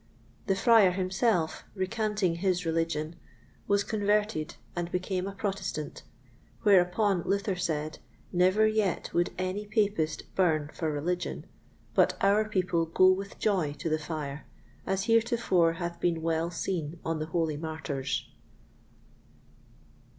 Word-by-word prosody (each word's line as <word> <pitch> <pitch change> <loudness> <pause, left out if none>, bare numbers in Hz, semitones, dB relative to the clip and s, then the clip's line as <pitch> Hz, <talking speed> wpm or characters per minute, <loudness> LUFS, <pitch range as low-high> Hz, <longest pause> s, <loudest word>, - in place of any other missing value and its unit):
The 195 - +3
Friar 220 -1 +6
himself, 185 -1 0
recanting 205 -2 0
his 180 -1 0
religion, 165 -1 -1 0.5
was 200 0 +3
converted 205 -6 0 0.2
and 175 0 -3
became 185 +1 -2
a - - -3
Protestant; 190 -7 -3 0.6
whereupon 195 0 +4
Luther 200 +2 0
said, 155 -3 -2 0.3
Never 185 +4 +4
yet 215 -4 0
would 175 0 +1
any 185 +3 -3
Papist 205 -7 0
burn 155 -5 +1
for 160 -3 -2
religion, 175 +5 -2 0.5
but - - +3
our 210 +2 +3
people 180 -4 +1
go 185 +3 +5
with 195 +1 -3
joy 180 -9 +1
to 160 - -4
the 155 0 +1
fire, 150 -2 -5 0.4
as 190 0 0
heretofore 230 -7 +3
hath 170 0 -5
been 170 -2 0
well 165 0 0
seen 170 -2 -3
on 165 -1 -1
the 155 - -3
holy 160 -2 0
Martyrs. 150 -3 -3
180 Hz, 125 wpm, -29 LUFS, 165-200 Hz, 0.6 s, Friar